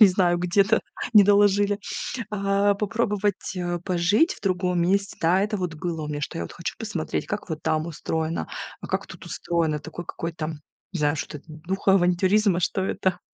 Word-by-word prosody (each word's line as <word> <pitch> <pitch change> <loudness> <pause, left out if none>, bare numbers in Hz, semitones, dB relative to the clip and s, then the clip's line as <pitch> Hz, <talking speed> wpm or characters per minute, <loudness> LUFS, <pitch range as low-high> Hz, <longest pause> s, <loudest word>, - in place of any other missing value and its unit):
я 215 - +12
не - - +8
знаю, 180 -2 +2
где-то 195 +5 +3 0.3
не 210 - +10
доложили. 205 0 +4 0.5
А, 200 0 +2
попробовать, 210 -2 -1
э, 175 -1 -2
пожить 185 - +2
в - - -18
другом 180 -2 +1
месте, 195 +3 +1
да, 175 +4 +4
это 210 +1 0
вот 180 -3 -2
было 165 -1 -3
у - - -4
меня, 150 0 -3
что 165 - -4
я - - -2
вот - - -10
хочу 170 - -5
посмотреть, 195 -8 -3
как 205 -3 -4
вот 160 -1 -4
там 155 +1 0
устроено, 160 0 -2 0.3
а - - -7
как - - -2
тут - - -11
устроено. 165 -3 -1
Такой 160 +3 -8
какой-то, 165 -2 -4 0.5
не 175 - -2
знаю, 145 0 +2
что 150 - -5
это, - - -18
духа 185 +5 0
авантюризма, 185 +1 +3
что 190 +2 0
это. 185 -2 0
180 Hz, 190 wpm, -25 LUFS, 165-200 Hz, 0.5 s, я